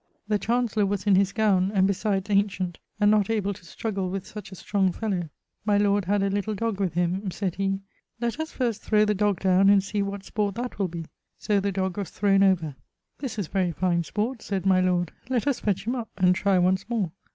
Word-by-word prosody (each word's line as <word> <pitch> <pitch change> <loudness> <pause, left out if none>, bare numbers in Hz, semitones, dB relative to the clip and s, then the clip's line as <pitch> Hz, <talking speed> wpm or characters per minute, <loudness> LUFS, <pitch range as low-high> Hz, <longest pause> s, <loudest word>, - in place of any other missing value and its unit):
The 210 -1 +1
Chancellour 225 -2 +1
was 195 0 -2
in 205 - +4
his 195 +1 +4
gowne, 195 -4 +2
and 190 -1 +4
besides 195 0 0
ancient, 195 -3 0 0.2
and 205 0 +5
not 210 -1 +3
able 205 -3 0
to 185 - -15
struggle 195 +2 -3
with 190 0 -4
such 210 -1 -9
a - - -8
strong 190 0 0
fellowe. 180 -5 -2 0.3
My 205 -1 +2
lord 205 -1 +2
had 200 +2 +1
a 200 - +1
little 205 +2 -1
dog 225 -1 -2
with; 185 -4 -1 0.4
sayd 190 -1 -2
he 195 0 -1 0.4
'Let 235 +4 -2
us 315 0 -3
first 235 -5 -1
throwe 215 -1 +3
the 210 - +2
dog 205 -2 0
downe, 190 +1 +4
and 200 -1 +5
see 205 +1 -2
what 200 0 -4
sport 205 -1 -2
that 240 -2 -5
will 195 - +1
be'; 170 -1 -6 0.3
so 205 -1 +1
the 200 +1 -1
dog 190 0 -2
was 195 -5 -3
throwne 195 -1 +2
over. 180 -6 +3 0.5
'This 260 -5 -5
is 205 - -1
very 185 -2 0
fine 170 0 +1
sport,' 215 - -2
sayd 195 -2 -3
my 185 -1 +4
lord, 180 -2 +1 0.2
'let 250 -2 0
us 280 -3 +1
fetch 195 -1 -1
him 235 - 0
up, 235 -3 -4
and 180 -2 +4
try 195 +1 +2
once 185 +3 +1
more.' 215 -8 -1
200 Hz, 225 wpm, -26 LUFS, 185-210 Hz, 0.5 s, and